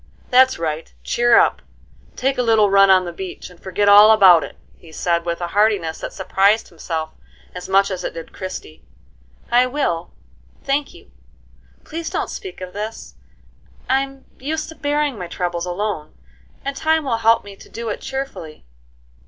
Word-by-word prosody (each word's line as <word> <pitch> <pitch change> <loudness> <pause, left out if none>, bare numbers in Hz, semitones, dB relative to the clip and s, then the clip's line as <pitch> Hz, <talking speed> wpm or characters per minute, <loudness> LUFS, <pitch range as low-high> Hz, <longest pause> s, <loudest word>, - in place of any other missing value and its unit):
"That's 260 +1 +5
right, 160 -1 -4
cheer 240 0 +3
up, - - +3 0.5
take 270 0 -1
a - - +4
little 220 -4 +3
run 195 0 +6
on 185 -1 +5
the 175 - -6
beach, 185 0 -8
and 175 - -19
forget 195 +2 -1
all 205 +1 +9
about 190 -7 +7
it," - - -9 0.2
he 165 - -17
said, 170 +1 -1
with 170 +1 -2
a 175 - -3
heartiness 200 -5 +1
that - - -6
surprised 200 +3 +1
himself 160 -1 -5 0.4
as 180 0 -8
much 195 +1 +3
as 185 -1 -4
it - - -5
did 165 -1 -9
Christie. 185 - -8 0.7
"I 245 +1 +4
will, 180 - -2 0.5
thank 280 +1 -1
you. - - -17 0.7
Please 330 +1 -5
don't - - -3
speak 380 - -8
of 185 0 -7
this; 215 +2 -6 0.7
I'm 270 0 -1
used 305 +4 -3
to 320 - -10
bearing 290 -5 -1
my 180 - -5
troubles 175 0 -3
alone, 180 -4 -4 0.5
and 275 0 -3
time 315 +2 +1
will 235 -4 0
help 230 0 +3
me 200 -1 -10
to - - -15
do 230 0 -5
it 210 - -4
cheerfully." 265 - -6
205 Hz, 170 wpm, -20 LUFS, 175-255 Hz, 0.7 s, all